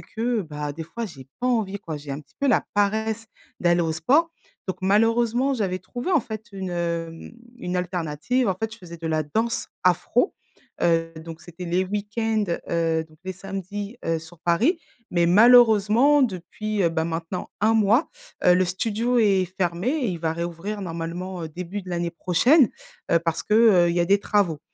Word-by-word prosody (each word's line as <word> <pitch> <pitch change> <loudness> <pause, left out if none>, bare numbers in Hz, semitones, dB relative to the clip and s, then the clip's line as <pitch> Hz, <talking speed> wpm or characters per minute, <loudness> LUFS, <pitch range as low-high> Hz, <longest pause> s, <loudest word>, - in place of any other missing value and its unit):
que 230 0 -2
bah, 150 -3 -5
des 160 +2 -7
fois 230 +9 -5
j'ai 135 - -10
pas 250 - -1
envie 215 -5 0
quoi. 160 -6 -6
J'ai 145 -1 -9
un 140 - -5
petit 150 - -24
peu 280 - +2
la 235 - +3
paresse 220 +2 0 0.3
d'aller 175 0 +3
au 160 - 0
sport 300 - +2 0.4
donc 185 -2 -3
malheureusement 230 +6 +2
j'avais 195 -7 -1
trouvé 245 - -5
en 345 -5 +4
fait 220 -1 -7
une, 190 -2 -5 0.4
mmh, 165 +6 -11 0.3
une 180 -3 -3
alternative. 180 - -1
En 190 - +1
fait 220 +3 -4
je 220 - -11
faisais 170 -3 -10
de 165 0 -6
la 155 -1 +1
danse 225 +10 -2
afro, 185 - +2 0.5
heu 165 -1 +2
donc 160 0 -9
c'était 175 +2 -9
les 180 +2 +1
week-ends, 210 +2 -1 0.3
heu, 165 -1 +1
donc 155 0 -21
les 190 - -3
samedis, 195 +4 -6
heu, 165 0 +1
sur 165 +1 -14
Paris. 225 - +2 0.3
Mais 170 -1 +2
malheureusement 235 +6 +6
depuis, 210 +1 -2
heu, 170 - +4
ben 160 -1 -1
maintenant 165 +2 -4
1 220 +2 +3
mois, 225 - +3 0.4
heu, 180 - +7
le 185 - +3
studio 225 +6 0
est 195 -4 +3 0.2
fermé 175 +4 0
et 285 -2 0
il 175 -3 -3
va 160 -1 -1
réouvrir 170 +5 -4
normalement, 175 +1 -5
heu, 160 - -5
début 180 +4 -6
de 185 - -9
l'année 170 -1 -1
prochaine, 210 - +4 0.4
heu, 170 - +6
parce 165 -1 -2
que, - - -4
heu, 200 -7 +6
il - - -1
y 175 - +3
a 170 - +2
des 200 +2 +4
travaux. 195 -8 +1
190 Hz, 190 wpm, -24 LUFS, 170-220 Hz, 0.5 s, heu